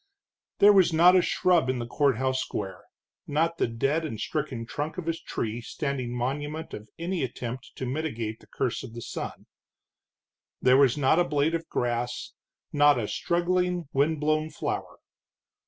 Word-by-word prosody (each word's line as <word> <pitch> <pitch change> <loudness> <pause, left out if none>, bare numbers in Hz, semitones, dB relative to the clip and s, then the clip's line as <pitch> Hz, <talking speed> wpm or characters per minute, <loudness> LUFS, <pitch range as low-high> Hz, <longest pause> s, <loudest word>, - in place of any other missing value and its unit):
There 205 +1 +7
was 190 -3 +5
not 175 +3 +6
a 185 - +6
shrub 175 -6 +2
in 130 - 0
the 120 - -3
courthouse 130 0 +1
square, 95 -2 -5 0.4
not 165 +3 0
the - - +2
dead 135 +8 0
and 130 -9 -5
stricken 140 -6 -3
trunk 145 +8 -4
of 175 -3 -5
a 165 - +2
tree 115 -7 -4
standing 135 -1 -3
monument 145 +6 -3
of 105 0 -8
any 170 -1 -2
attempt 125 0 -5
to 130 - -4
mitigate 120 -6 -3
the - - -20
curse 120 -2 -2
of 120 -3 -9
sun. - - -6 1.1
There 130 0 +5
was 135 -1 +4
not 145 +3 +3
a - - +5
blade 155 -1 +1
of 165 0 -3
grass, 120 0 -2 0.4
not 145 -1 +5
a 110 -3 -1
struggling, 180 - 0
wind 150 +3 +2
blown 155 +1 +1
flower. 150 - -4
145 Hz, 160 wpm, -27 LUFS, 125-165 Hz, 1.1 s, There